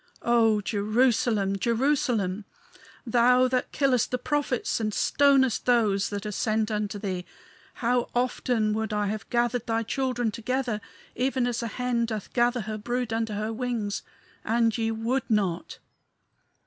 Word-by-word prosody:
"O 225 -3 +3
Jerusalem! 215 -1 +1
Jerusalem! 230 -5 0 0.6
thou 250 +2 +4
that 255 0 -1
killest 265 -5 +2
the 250 - -1
prophets 270 -2 -1
and 215 -1 -1
stonest 270 +1 +3
those 215 -5 +3
that 205 0 -5
are 210 - -3
sent 215 +2 0
unto 210 -1 -2
thee 190 -3 -3 0.6
how 245 0 +2
often 245 -3 +1
would 220 0 -2
I 210 0 0
have 215 0 -5
gathered 240 0 0
thy 225 0 0
children 245 -1 -1
together, 235 -1 -2 0.3
even 260 0 0
as 245 -1 -1
a 235 - -2
hen 240 0 -1
doth 215 -3 -5
gather 240 0 +2
her 215 0 -5
brood 240 +1 -2
under 225 -2 -1
her 215 +2 -2
wings 230 -4 -2 0.4
and 230 0 +2
ye 225 -1 0
would 230 +4 -1
not. 195 -6 0
230 Hz, 145 wpm, -26 LUFS, 215-250 Hz, 0.6 s, thou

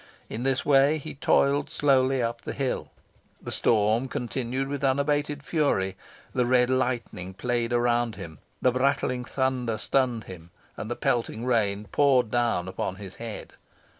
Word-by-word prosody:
In 115 - -5
this 135 +1 0
way 140 +2 +5
he 155 0 -7
toiled 140 +1 +2
slowly 135 -4 +2
up 115 0 -2
the - - -5
hill. 135 -2 -2 0.5
The - - -7
storm 110 +3 +2
continued 125 +2 -3
with 140 0 -4
unabated 145 +2 +1
fury: 140 - 0 0.4
the 125 -2 +1
red 125 0 +3
lightning 120 -8 -2
played 120 +1 -1
around 120 -2 +1
him, 85 -6 -9 0.2
the 125 - +5
brattling 130 -1 0
thunder 130 -4 -1
stunned 125 -1 0
him, 85 -3 -11 0.3
and 110 - -6
the 120 - -2
pelting 115 -1 -1
rain 105 -4 +1
poured 130 -6 +3
down 120 -7 +1
upon 95 0 -3
his 95 -1 -10
head. 115 -2 -7
125 Hz, 150 wpm, -26 LUFS, 115-135 Hz, 0.5 s, way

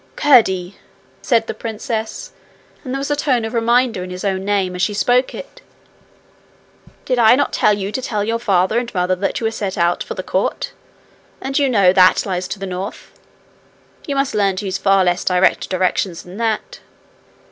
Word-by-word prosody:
'Curdie!' 200 -10 +3 0.4
said 230 -3 +2
the - - -4
princess, 220 - -5 0.5
and 255 - -6
there 270 - -1
was 280 +1 -3
a - - +2
tone 260 -5 0
of 225 - -6
reminder 235 -3 +1
in 180 - -7
his 180 +2 -6
own 190 -1 -1
name 195 -2 0
as 180 - -4
she 205 +3 0
spoke 245 +5 +1
it, - - -10 1.4
'did 255 -2 0
I 225 +1 +6
not 285 - 0
tell 210 - +3
you 200 0 -3
to 260 - -3
tell 210 -4 -2
your 230 +2 -1
father 195 0 +2
and 240 -1 -5
mother 180 0 +1
that 195 +2 -2
you 230 - -3
were 225 - +1
to - - -8
set 195 -2 -3
out 175 0 +1
for - - -5
the - - -5
court? - - -2 0.7
And 270 +1 -2
you 280 -2 +2
know 200 -7 +4
that 185 -1 +5
lies 185 -2 -3
to 190 - -5
the 195 - -6
north. 185 +2 -6 1.0
You 285 - -2
must 275 0 0
learn 200 -2 +1
to 200 +2 -5
use 190 - -2
far 195 -1 +3
less 180 +2 0
direct 180 0 +2
directions 185 -1 -1
than 180 +2 -11
that. 230 - -2
210 Hz, 200 wpm, -18 LUFS, 185-240 Hz, 1.4 s, I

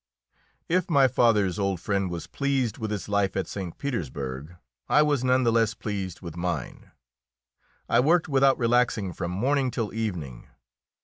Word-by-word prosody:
If 180 +2 +1
my 140 -5 +5
father's 105 -6 +2
old 100 -3 0
friend 100 0 -1
was 85 -1 -5
pleased 135 -6 -1
with 110 -2 -3
his 105 -1 -4
life 100 -2 0
at 95 - 0
St. 95 -4 -6
Petersburg, 75 - -4 0.3
I 150 - +5
was 145 -4 +1
none 130 0 +3
the 115 - +3
less 115 -2 +2
pleased 100 -5 -5
with 85 -3 -8
mine. 85 0 -4 1.0
I - - +3
worked 165 +6 +3
without 135 -2 +3
relaxing 115 -5 +1
from 85 - -4
morning 130 +8 +1
till 115 -4 -3
evening. 90 - -4
110 Hz, 160 wpm, -26 LUFS, 90-130 Hz, 1.0 s, my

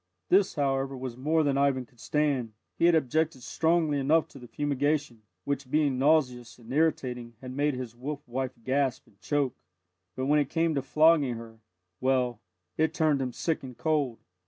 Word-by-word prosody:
This, 195 +1 +4
however, 135 -2 0
was 130 -2 -5
more 155 +5 +1
than 140 -2 +1
Ivan 135 -2 +2
could 120 0 -28
stand 140 -7 0 0.2
he - - +2
had 170 -1 +6
objected 155 -2 0
strongly 160 +1 +1
enough 155 +4 +3
to 135 - -13
the 125 - -11
fumigation, 145 -3 -1 0.2
which, 140 -2 -3
being 145 -3 +1
nauseous 130 -5 +2
and 120 +1 -10
irritating, 125 -6 0
had 130 -1 -8
made 145 0 +1
his 125 -2 -6
wolf 145 +4 -6
wife 130 +1 -3
gasp 135 +1 0
and 100 0 -27
choke; 145 -4 0 0.6
but 130 - -2
when 150 +2 +4
it 145 -2 0
came 165 0 +1
to 140 - 0
flogging 150 -2 +3
her 115 -1 -10 0.4
well, 125 -3 +1 0.4
it 160 +1 +2
turned 155 -4 +2
him 130 -1 -2
sick 160 +6 -2
and 125 -3 -9
cold. 145 -7 0
140 Hz, 180 wpm, -28 LUFS, 125-150 Hz, 0.6 s, had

